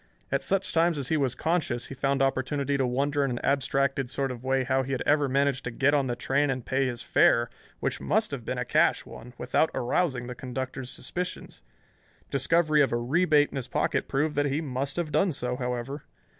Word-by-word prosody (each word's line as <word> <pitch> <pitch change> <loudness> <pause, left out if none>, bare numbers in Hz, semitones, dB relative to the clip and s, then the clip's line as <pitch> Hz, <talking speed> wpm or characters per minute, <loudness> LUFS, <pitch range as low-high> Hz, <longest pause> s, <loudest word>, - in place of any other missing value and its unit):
At - - +1
such 195 0 0
times 165 -1 +3
as 135 -2 -3
he 160 - +2
was 135 -4 0
conscious 155 -8 -1
he - - -6
found 135 +1 0
opportunity 140 +1 0
to 135 -2 +1
wonder 140 +3 0
in 135 - 0
an 120 - -2
abstracted 135 -1 +1
sort 135 0 -1
of 125 -1 -8
way 130 0 +1
how 130 +1 +1
he 135 +1 -3
had 130 - -1
ever 145 -1 +3
managed 140 0 +1
to - - -1
get 140 +4 +2
on 140 -2 +2
the 120 - -1
train 140 +4 +1
and 130 -2 -2
pay 135 0 +1
his 120 -1 -5
fare, 120 0 +3 0.3
which - - -2
must - - +1
have - - -5
been - - -3
a - - -2
cash - - +2
one, 125 +1 -11
without 140 +5 +1
arousing 125 0 0
the 125 - -5
conductor's 130 0 -5
suspicions. 180 - -5 0.7
Discovery 155 +3 +3
of 140 - +2
a 120 - +1
rebate 150 +4 +3
in - - -5
his 130 -2 -4
pocket - - 0
proved 150 +3 0
that 145 0 +2
he 140 +2 0
must 135 -2 -3
have 170 -3 -2
done 165 +6 +2
so, 125 -3 -2
however. 125 +3 -4
135 Hz, 215 wpm, -27 LUFS, 125-145 Hz, 0.7 s, times